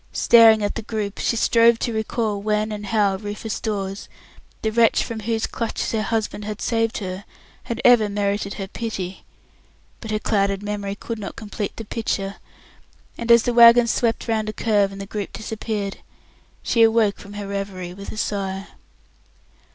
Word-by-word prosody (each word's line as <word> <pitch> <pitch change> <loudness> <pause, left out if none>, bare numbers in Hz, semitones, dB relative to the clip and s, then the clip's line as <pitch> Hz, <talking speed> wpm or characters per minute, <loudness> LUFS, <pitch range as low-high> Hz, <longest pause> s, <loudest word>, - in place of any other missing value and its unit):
Staring 225 -2 +6
at 205 - 0
the 225 - -4
group, 210 -2 -4
she - - 0
strove 230 0 +4
to 235 - -2
recall 220 -1 -2
when 215 +1 0
and 210 -1 -5
how 200 -2 +2
Rufus 210 +2 -5
Dawes, 195 -3 -4 0.5
the 220 - +1
wretch 230 0 +3
from 230 -1 -5
whose 225 +1 -1
clutches 230 -3 -3
her 220 - 0
husband 215 -1 -2
had 210 +1 -5
saved 225 -1 0
her, 190 -1 -5 0.4
had 235 0 -4
ever 235 -4 +6
merited 200 0 -1
her 195 -2 -5
pity, 195 -4 -5 0.8
but 225 - -9
her 215 - 0
clouded 200 -2 0
memory 205 -1 -3
could 225 +2 -6
not 200 - -6
complete 210 -1 -5
the 225 - -6
picture, 200 -3 -3 0.8
and 235 0 -1
as 235 -1 +7
the 245 - 0
wagons 235 0 +7
swept 230 0 0
round 220 -2 0
a - - -4
curve, 205 -3 +1
and 195 - -9
the 195 - -5
group 205 0 -5
disappeared, 215 -2 -4 0.7
she 230 - +2
awoke 225 -2 +4
from 200 0 -11
her 205 0 -5
reverie 195 -3 -5
with 200 +2 -8
a - - -9
sigh. 195 -2 -3
215 Hz, 175 wpm, -22 LUFS, 200-225 Hz, 0.8 s, as